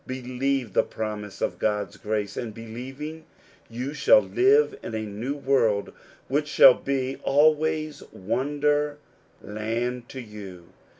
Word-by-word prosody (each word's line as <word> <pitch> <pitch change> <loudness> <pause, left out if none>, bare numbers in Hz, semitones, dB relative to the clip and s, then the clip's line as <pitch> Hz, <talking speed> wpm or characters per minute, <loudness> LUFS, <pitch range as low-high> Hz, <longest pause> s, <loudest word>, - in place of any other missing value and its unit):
Believe 130 -2 -2
the - - +5
promise 105 -2 -6
of - - -1
God's 105 -1 -1
grace, 105 -1 -3
and 110 -3 -5
believing, 130 +8 -7 0.5
you 125 +5 -4
shall - - +6
live 415 +4 +3
in 110 - -6
a 110 - -2
new 110 +6 -4
world 125 -8 +1 0.3
which 145 +3 0
shall 140 -3 +8
be 135 0 -2
always 155 +1 +2
wonder 145 +7 0 0.5
land 115 +4 -3
to 130 - -7
you. 100 -7 -10
125 Hz, 125 wpm, -25 LUFS, 110-145 Hz, 0.5 s, shall